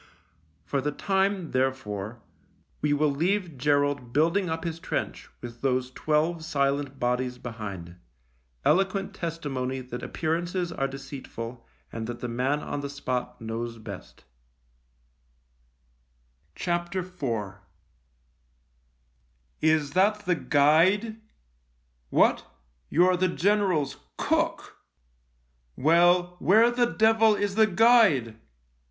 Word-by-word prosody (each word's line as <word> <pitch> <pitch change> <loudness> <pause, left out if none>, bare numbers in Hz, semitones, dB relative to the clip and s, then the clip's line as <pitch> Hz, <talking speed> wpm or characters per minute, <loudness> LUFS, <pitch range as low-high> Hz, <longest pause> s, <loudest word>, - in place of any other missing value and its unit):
For 140 - -1
the 150 +2 -1
time, 190 +1 0
therefore, 120 -5 -2 0.6
we 150 - +1
will 145 0 +2
leave 175 +3 0
Gerald 145 -2 0
building 170 +6 +2
up 160 0 -3
his 165 -1 -4
trench - - -4
with 120 -1 -9
those 130 -1 0
twelve 155 +4 0
silent 140 -3 -1
bodies 125 0 -1
behind 100 -8 -7 0.3
— - - -38
eloquent 195 +3 +2
testi 165 -3 -4
mony 130 0 -2
that 125 -1 -7
appearances 170 +2 -2
are 135 -4 -1
deceitful 130 -3 -8 0.2
and 115 -1 -5
that 120 0 -6
the 125 - -4
man 130 +5 0
on 145 - -4
the 140 - -5
spot 125 -3 -4
knows 115 +1 -4
best 105 -4 -10 2.3
IV 175 +1 -3 2.4
"Is 155 -2 +2
that 205 +5 +2
the 180 - +2
guide? 175 +10 +3 0.9
What, - - +3 0.4
you're 180 +2 +4
the 185 +1 +2
general's 185 -5 +1 0.2
cook! - - -1 1.0
Well, 175 +3 +3
where 225 +6 +5
the 240 0 +2
devil 220 -1 +4
is 205 -1 -1
the 220 +1 +4
guide 185 - +4
150 Hz, 110 wpm, -27 LUFS, 125-180 Hz, 2.4 s, where